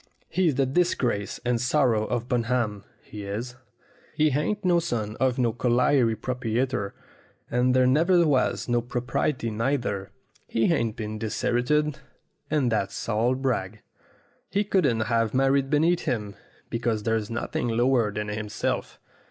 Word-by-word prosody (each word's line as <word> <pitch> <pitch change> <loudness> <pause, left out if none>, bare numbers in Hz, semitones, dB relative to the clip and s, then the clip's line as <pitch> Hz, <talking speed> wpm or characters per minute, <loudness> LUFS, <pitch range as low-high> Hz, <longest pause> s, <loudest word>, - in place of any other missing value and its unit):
He's 170 -5 +1
the 135 +1 +2
disgrace 130 - 0
and 120 -1 +1
sorrow 125 -4 +2
of 120 +1 -2
Bunham, 115 -4 -1 0.2
he 105 -1 -9
is. 110 +5 -4 0.6
He 155 0 +3
ain't 185 +9 -1
no 175 -1 +4
son 110 -10 -3
of 130 -2 +2
no 120 -3 +1
colliery 125 0 +2
proprietor, 120 -2 -2 0.6
and 125 +1 +2
there 130 0 +5
never 170 +7 +4
was 140 -4 +1
no 120 -1 +2
property 125 0 -2
neither. 115 -4 -1 0.4
He 115 +9 +2
ain't 115 -7 0
been 110 -1 -5
dis 110 -1 -3
herited, 150 +5 +1 0.5
and 145 -6 +1
that's 100 -3 -2
all 115 +3 +1
brag. 115 -6 -2 0.7
He 200 +1 +1
couldn't 145 - +2
have 115 0 0
married 135 +1 +2
beneath 165 +4 +2
him, 105 -5 -2 0.4
because 115 -2 -1
there's 110 -2 0
nothing 120 +1 -2
lower 120 -1 +2
than 105 +1 -4
him 105 0 -4
self. - - -3
120 Hz, 145 wpm, -26 LUFS, 110-135 Hz, 0.7 s, there